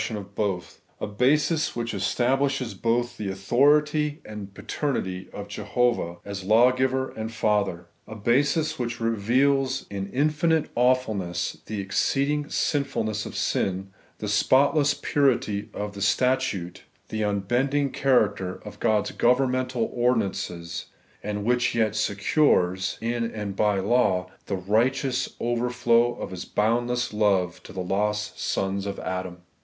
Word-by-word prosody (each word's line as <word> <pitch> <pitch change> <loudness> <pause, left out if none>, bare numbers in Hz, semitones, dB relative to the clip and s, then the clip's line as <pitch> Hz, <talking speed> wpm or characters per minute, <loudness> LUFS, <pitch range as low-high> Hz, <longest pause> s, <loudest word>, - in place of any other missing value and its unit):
8ion 110 0 -3
of 100 0 -9
both; 100 -4 -3 0.2
a - - -2
basis 145 +9 +1
which 120 -1 -3
establishes 130 +5 0
both 120 +1 -1
the 105 -2 -3
authority 150 - +2
and 105 -2 -7
the - - -21
paternity 95 -6 -3
of 100 0 -7
Jehovah, 105 -3 0
as 100 -1 -5
Law 115 +6 +5
giver 130 +1 0
and 110 0 -5
Father; 105 -6 0 0.2
a 110 - -8
basis 145 +8 +1
which 120 -1 -3
reveals 130 +5 +1
in 100 0 -4
infinite 155 +3 +1
awfulness 115 -8 0
the 110 -2 -4
exceeding 140 +9 0
sinfulness 110 -8 -1
of - - -9
sin, 95 0 -1 0.3
the 105 - -5
spot 130 +8 +3
less 145 -2 +3
purity 120 -8 +1
of 105 0 -5
the 100 - -8
statute, 105 -4 0 0.3
the 110 - -3
nnbending 120 +8 0
character 105 -8 +2
of 105 - -9
God*» 110 -3 +1
governmental 125 -1 +2
ordinances; 100 -8 -1 0.3
and 105 0 -3
which 125 0 +2
yet 110 -2 +1
secures, 100 - +2
in 115 0 -1
and 105 -2 -5
by 105 0 +2
law, 95 -4 +1 0.2
the 100 - -1
righteous 125 +7 0
overflow 120 0 +2
of - - -6
His 90 -1 -5
boundless 120 +2 0
love 95 -5 +1
to - - -12
the 95 - -4
lost 105 +3 -1
sons 95 +1 -1
of 100 - -4
Adam. 90 -1 -5
110 Hz, 135 wpm, -25 LUFS, 100-130 Hz, 0.3 s, Law